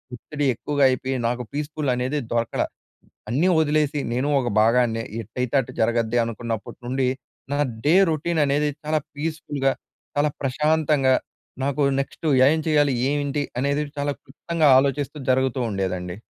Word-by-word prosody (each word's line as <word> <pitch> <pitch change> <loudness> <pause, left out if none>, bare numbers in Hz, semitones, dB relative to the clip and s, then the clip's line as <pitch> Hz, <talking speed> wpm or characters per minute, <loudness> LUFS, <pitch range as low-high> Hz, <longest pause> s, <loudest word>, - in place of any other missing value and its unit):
ఒత్తిడి 145 +4 -4
ఎక్కువగా 145 +4 -1
అయిపియి, 130 +1 -1
నాకు 125 +1 -2
పీస్ఫుల్ 150 -1 -2
అనేది 130 +4 -1
దొరకలా. 115 -1 0 0.6
అన్నీ 140 +10 +2
వదిలేసి, 150 -1 +1
నేను 130 +4 0
ఒక 125 - -2
భాగాన్నే. 115 0 +3 0.2
ఎట్టయితే 125 +4 -4
అటు 125 - -3
జరగద్దె. 115 +1 +1
అనుకున్నప్పుటి 115 -2 -5
నుండి, 130 +2 0 0.5
నా 145 - 0 0.3
డే 150 - +5 0.2
రొటీన్ 160 +1 0
అనేది, 145 +2 +1
చాలా 155 0 +1 0.2
పీస్ఫుల్‍గా, 145 -3 -1 0.5
చాలా 145 +1 +2
ప్రశాంతంగా, 150 0 +2 0.5
నాకు 140 +1 -1 0.2
నెక్స్టు 150 +3 -6 0.2
ఏం 160 - +2
చేయాలి? 145 -4 +3
ఏయింటి? 145 0 -1 0.2
అనేది, 140 +2 +1 0.2
చాలా 145 0 0
క్లుప్తంగా 155 +3 0
ఆలోచిస్తూ 140 +1 -1
జరుగుతూ 130 0 +1
ఉండేదండి. 90 -2 -3
140 Hz, 135 wpm, -23 LUFS, 125-150 Hz, 0.6 s, డే